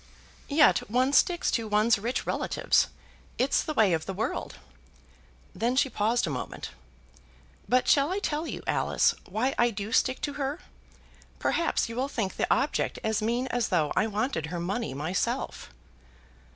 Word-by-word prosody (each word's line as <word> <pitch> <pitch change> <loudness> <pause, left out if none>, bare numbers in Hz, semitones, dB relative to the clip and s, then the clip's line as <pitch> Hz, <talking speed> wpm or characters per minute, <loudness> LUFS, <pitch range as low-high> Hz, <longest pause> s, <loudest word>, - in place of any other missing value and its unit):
"Yet 300 +1 +5
one 255 +4 +2
sticks 345 +3 +3
to 230 -2 -1
one's 215 +1 +3
rich 235 +5 -2
relatives. - - +1 0.5
It's 265 +2 +2
the 310 - -4
way 205 -5 +4
of 160 -1 -2
the 190 - -4
world." 225 +6 -3 1.0
Then 240 +3 0
she 270 0 +2
paused 225 +4 +1
a - - -3
moment. - - -5 1.0
"But 255 +1 +3
shall 285 +3 +4
I 380 - 0
tell 315 -5 -2
you, - - -6
Alice, - - +2
why 250 +5 0
I 240 - +5
do 205 -1 -5
stick 260 +2 +2
to 290 - -2
her? 275 +4 -2 0.8
Perhaps 335 - 0
you'll 245 +4 -2
think 220 -8 -3
the - - -1
object 275 +5 +1
as 220 -1 0
mean 235 +4 0
as 245 -2 0
though 160 -6 +1
I 215 - +2
wanted 210 - -2
her 175 +2 -4
money 175 - -3
myself." 160 +6 -2
235 Hz, 160 wpm, -28 LUFS, 210-270 Hz, 1.0 s, Yet